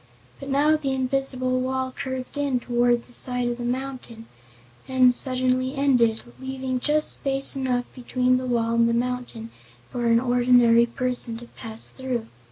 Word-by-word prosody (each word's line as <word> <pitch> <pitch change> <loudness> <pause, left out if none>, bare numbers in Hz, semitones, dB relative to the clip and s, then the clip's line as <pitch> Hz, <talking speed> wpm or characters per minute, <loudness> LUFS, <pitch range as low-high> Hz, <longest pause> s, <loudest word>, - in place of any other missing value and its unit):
But 275 - -8
now 290 +3 +3
the 275 -3 -2
invisible 255 -1 -1
wall 260 0 -2
curved 260 -1 -5
in 285 -3 0
toward 240 0 +1
the 245 - -16
side 250 0 -1
of 240 0 -4
the - - -4
mountain 250 -2 -5 0.6
and 255 -1 +4
suddenly 255 +1 -1
ended, 245 -5 +2 0.2
leaving 260 -1 -3
just 300 +3 +1
space 275 0 +2
enough 255 -2 -1
between 255 0 0
the 255 0 -4
wall 230 -2 0
and 235 0 +3
the 235 - +1
mountain 240 -2 -3 0.4
for 240 -1 -2
an 230 0 +4
ordinary 245 -1 +4
person 245 -1 -2
to 240 - -10
pass 225 -1 -2
through. 255 -3 -4
255 Hz, 160 wpm, -24 LUFS, 240-265 Hz, 0.6 s, and